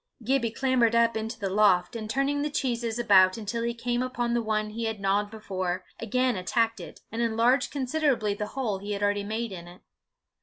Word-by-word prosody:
Gibbie 250 0 +1
clambered 240 -1 +2
up 230 -1 +3
into 220 +1 -3
the 200 - -2
loft, 190 -2 +3
and 215 -2 -5
turning 275 +4 0
the 300 - -1
cheeses 240 -5 -2
about 190 -5 +5
until 225 +2 -3
he 235 0 -2
came 240 +1 -1
upon 245 -2 -1
the 235 - +1
one 215 -1 -1
he 230 +1 -4
had 220 -2 -3
gnawed 200 +1 +1
before, 185 -4 -4
again 250 +2 +1
attacked 225 +5 0
it, - - -10
and 230 - -3
enlarged 235 +3 +2
considerably 265 -6 0
the 210 +1 -4
hole 220 -7 -1
he 205 +1 -4
had 200 0 -3
already 205 0 +1
made 220 +2 -3
in 175 -2 -8
it. 175 +1 -14
225 Hz, 200 wpm, -27 LUFS, 205-240 Hz, -, about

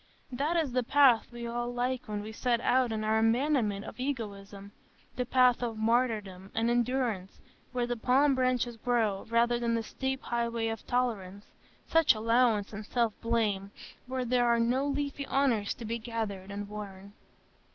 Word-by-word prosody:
That 290 +7 0
is 310 -6 0
the 250 +1 +1
path 255 -2 +4
we 240 0 -7
all 240 +1 -3
like 250 +1 -2
when 210 -1 -4
we 215 - -7
set 235 +1 0
out 250 0 +2
on 215 -1 -2
our 220 +1 +2
abandonment 225 -3 +1
of - - -10
egoism,—the 205 -2 -6
path 250 -1 +4
of 230 -2 -3
martyrdom 215 -5 0
and 230 +1 +1
endurance, 240 -5 -1 0.3
where 245 -1 -1
the 245 0 -2
palm 265 +5 +3
branches 255 -2 0
grow, 225 -4 0
rather 235 +1 +2
than 235 -1 0
the 230 - -1
steep 265 +3 -3
highway 235 -1 -1
of 225 -2 -6
tolerance, 210 -6 -2 0.4
just 325 -6 +4
allowance, 225 -1 +2
and 210 +1 -7
self 235 -3 +1
blame, 215 -4 0 0.4
where 255 0 -2
there 245 0 +2
are 235 0 +3
no 250 +4 +1
leafy 280 0 -3
honours 245 -7 +1
to 235 - -8
be 230 +2 -3
gathered 220 -4 -4
and 200 0 -5
worn. 200 -1 -9
235 Hz, 165 wpm, -30 LUFS, 215-250 Hz, 0.4 s, path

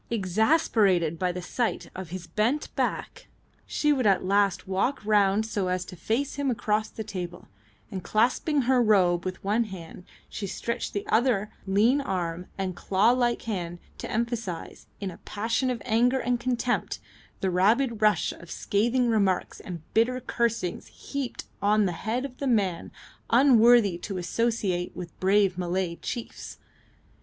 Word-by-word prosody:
Exasperated 200 - +2
by 180 -1 +1
the 180 0 -6
sight 235 +5 -2
of 185 -2 -6
his 180 0 -6
patiently 165 - -25
bent 235 +8 0
back, - - -2 0.4
she 300 0 +2
would 255 -6 +1
at 195 -2 +3
last 200 -1 +2
walk 195 +9 0
round 205 0 +3
so 205 -4 -2
as 180 0 -1
to 180 - -10
face 230 - -2
him 285 -1 0
across 215 -2 0
the 220 - -6
table, 180 -4 -6 0.4
and 185 -2 -5
clasping 250 - +2
her 255 0 +3
robe 185 -6 +3
with 185 0 -5
one 215 +4 +1
hand 180 -4 -9 0.2
she 200 - -5
stretched 235 +5 -3
the 205 - -3
other 220 -2 +2 0.2
lean 225 +9 +3
arm 180 -6 -3
and 190 -2 -2
claw 195 +6 +3
like 240 -1 +1
hand 175 -6 -4 0.2
to - - -5
emphasise, 225 -6 -3
in 195 -2 -4
a 170 - -13
passion 225 +5 -1
of 245 -4 -3
anger 245 +4 +3
and 245 -1 0
contempt, 245 0 -1 0.4
the 190 - +1
rapid 220 +6 +2
rush 210 -5 +3
of 170 - -12
scathing 240 +8 +1
remarks 200 -5 +1
and 170 -4 -8
bitter 245 +3 +2
cursings 230 -7 -2
heaped 275 -3 -5 0.2
on 210 +1 +3
the 185 - 0
head 225 +9 -2
of 255 -2 -9
the 280 - -2
man 200 -8 +1 0.4
unworthy 235 -6 +5
to 195 +1 -5
associate 190 -2 -1
with 175 -2 -8
brave 190 -1 +3
Malay 180 -1 -1
chiefs. 235 -2 -6
210 Hz, 160 wpm, -27 LUFS, 185-235 Hz, 0.4 s, unworthy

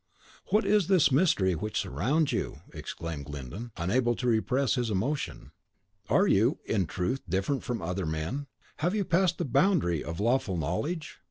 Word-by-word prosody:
"What 215 +2 +2
is 210 -5 +3
this 185 -7 +4
mystery 130 - +3
which 105 +6 -2
surrounds 150 +3 +1
you?" - - -3
exclaimed 80 -4 -6
Glyndon, 75 - -7
unable 120 +8 +1
to 125 - -4
repress 125 +3 +2
his 120 -3 0
emotion. 110 - -2 0.6
"Are 195 - +4
you, 115 - +3
in 95 -6 0
truth, 90 +12 -2
different 95 - 0
from 120 -8 -3
other 90 0 -2
men? 80 - -3 0.3
Have 175 +6 0
you 205 -2 0
passed 175 0 +2
the 175 - -1
boundary 140 - +2
of 85 0 -5
lawful 115 -4 +1
knowledge? 145 - -3
120 Hz, 160 wpm, -29 LUFS, 90-150 Hz, 0.6 s, this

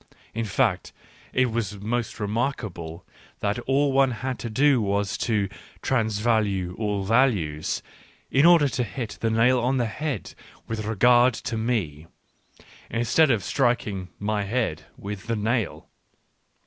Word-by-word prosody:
In 115 0 -2
fact 105 -2 0 0.4
it 130 -2 +2
was 105 -3 -3
most 115 +4 -2
remarkable 105 - -3 0.3
that 105 +3 -1
all 135 +3 +1
one 135 0 +4
had 125 +1 -4
to 115 - -4
do 135 +2 +3
was 100 -1 0
to 105 -4 +1 0.2
" - - -24
transvalue 110 -6 +1
all 105 -3 -1
values," 95 - +1 0.5
in 135 - +4
order 170 -3 +7
to 125 -2 -1
hit 115 +1 -6
the 115 - +1
nail 115 +3 +4
on 125 +3 +1
the 120 - +1
head 145 +6 -4 0.3
with 110 -1 -3
regard 120 +3 +4
to 115 - -4
me, 100 -10 -2 0.8
instead 120 +7 +3
of 110 -7 +2
striking 110 -8 0
my 105 0 -1
head 100 -7 -2
with 100 +1 -7
the 115 - 0
nail. 110 +1 -1
115 Hz, 140 wpm, -25 LUFS, 100-125 Hz, 0.8 s, order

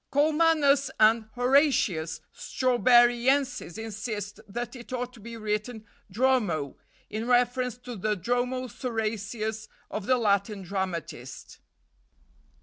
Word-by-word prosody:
Colmanus 295 -2 +3
and 220 +1 +5
Horatius 245 - +2
Strawberryensis 245 -2 +2
insist 215 -2 -5
that 240 +4 -5
it 240 -1 -11
ought 250 0 -3
to 235 - -14
be 230 +2 -9
written 215 +1 -3 0.2
Dromo, 205 - +1 0.4
in 220 +2 -3
reference 250 0 +2
to 245 -1 -8
the 210 +1 -1
Dromo 245 +6 -1
Sorasius 220 -3 -3 0.2
of 210 -2 -4
the 255 - +4
Latin 200 -2 0
dramatist." 175 -9 -5
235 Hz, 105 wpm, -27 LUFS, 210-250 Hz, 0.4 s, and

